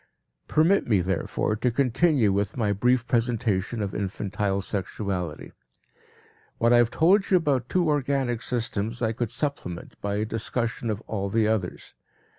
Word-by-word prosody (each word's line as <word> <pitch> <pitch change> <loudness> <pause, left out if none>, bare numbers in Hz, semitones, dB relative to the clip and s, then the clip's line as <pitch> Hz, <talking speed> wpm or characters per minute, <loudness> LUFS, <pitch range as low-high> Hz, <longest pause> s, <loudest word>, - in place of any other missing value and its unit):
Permit 170 +6 +3
me, 105 -5 +3
therefore, 95 +3 -1
to 115 +4 +1
continue 125 - +2
with 100 +3 -1
my 105 -4 +1
brief 120 +4 +2
presentation 115 -3 0
of 100 - -4
infantile 100 0 -2
sexuality. 95 -4 -4 1.1
What 115 +1 +3
I - - +7
have 120 -1 +4
told 190 - +3
you 185 - +6
about 140 -7 0
two 180 -2 +2
organic 135 -5 0
systems 115 -1 -3
I 110 - +2
could 115 0 -2
supplement 140 - -4
by 100 0 -2
a 105 +1 0
discussion 115 +1 -2
of 105 0 -2
all 100 -3 -3
the 110 +1 +2
others. 105 -5 -2
115 Hz, 150 wpm, -26 LUFS, 100-125 Hz, 1.1 s, I